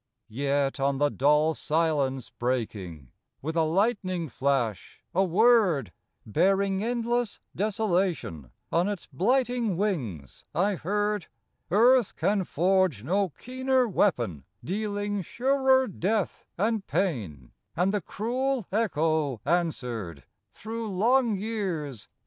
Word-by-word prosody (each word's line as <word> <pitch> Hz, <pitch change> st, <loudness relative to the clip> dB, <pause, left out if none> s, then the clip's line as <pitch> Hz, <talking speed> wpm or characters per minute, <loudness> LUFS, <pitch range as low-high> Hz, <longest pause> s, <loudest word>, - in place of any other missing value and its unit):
Yet, 140 Hz, +3 st, 0 dB
on 135 Hz, 0 st, +1 dB
the 145 Hz, +1 st, +2 dB
dull 150 Hz, +3 st, +3 dB
silence 150 Hz, -6 st, 0 dB
breaking 100 Hz, -, -3 dB, 0.3 s
With 160 Hz, +4 st, -4 dB
a 165 Hz, -, +3 dB
lightning 185 Hz, -1 st, 0 dB
flash, 125 Hz, -6 st, -1 dB
a 190 Hz, +2 st, +3 dB
Word, 185 Hz, -, +3 dB, 0.3 s
Bearing 195 Hz, -, +2 dB
endless 240 Hz, -1 st, -1 dB, 0.2 s
desolation 185 Hz, -, -1 dB, 0.2 s
On 170 Hz, +3 st, +2 dB
its 205 Hz, -3 st, -4 dB
blighting 240 Hz, -, +1 dB
wings, 125 Hz, -, -3 dB
I 195 Hz, +4 st, +2 dB
heard: 205 Hz, +2 st, -1 dB, 0.4 s
Earth 235 Hz, +4 st, +4 dB
can 200 Hz, -2 st, +1 dB
forge 180 Hz, -, +1 dB
no 190 Hz, +7 st, +1 dB
keener 260 Hz, -, 0 dB
weapon, 120 Hz, -, 0 dB, 0.2 s
Dealing 205 Hz, +1 st, -2 dB
surer 265 Hz, -, +2 dB
death 200 Hz, +2 st, -2 dB
and 215 Hz, +1 st, 0 dB
pain, 115 Hz, -, -2 dB, 0.2 s
And 180 Hz, +4 st, +1 dB
the 205 Hz, -, 0 dB
cruel 250 Hz, +5 st, -2 dB
echo 160 Hz, -, +1 dB
answered 125 Hz, -, -2 dB, 0.3 s
Through 225 Hz, -, -5 dB
long 235 Hz, +2 st, +3 dB
years 185 Hz, -, -3 dB
again. -, -, -39 dB
185 Hz, 110 wpm, -27 LUFS, 140-215 Hz, 0.4 s, Earth